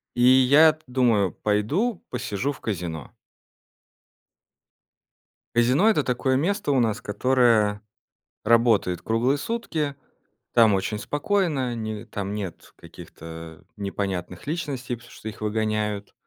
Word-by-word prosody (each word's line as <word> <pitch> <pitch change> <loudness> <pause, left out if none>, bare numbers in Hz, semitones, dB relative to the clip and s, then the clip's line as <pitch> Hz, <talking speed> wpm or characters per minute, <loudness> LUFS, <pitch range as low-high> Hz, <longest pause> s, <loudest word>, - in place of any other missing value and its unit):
И 120 - -1
я-то 140 +5 +6
думаю: 120 -7 +2
пойду 140 - -1
посижу 125 +1 -2
в 140 - -10
казино. 85 - -5 2.4
Казино- 125 - +4
это 210 -10 +2
такое 130 +1 0
место 180 +4 0
у 135 - +3
нас, 115 -3 0
которое 110 -2 +2 0.6
работает 110 -6 +3
круглые 120 +5 +1
сутки. 155 -6 -3 0.6
Там 115 -3 +6
очень 100 +2 -1
спокойно, 145 - -1
ни 110 -1 -5
там 100 -3 -5
нет 100 -5 -7
каких-то 80 0 -11
непонятных 95 -2 -4
личностей, 140 -6 -3
потому 120 +1 -17
что 110 - -8
их 110 - -9
выгоняют. 105 -1 -2
115 Hz, 110 wpm, -24 LUFS, 105-135 Hz, 2.4 s, я-то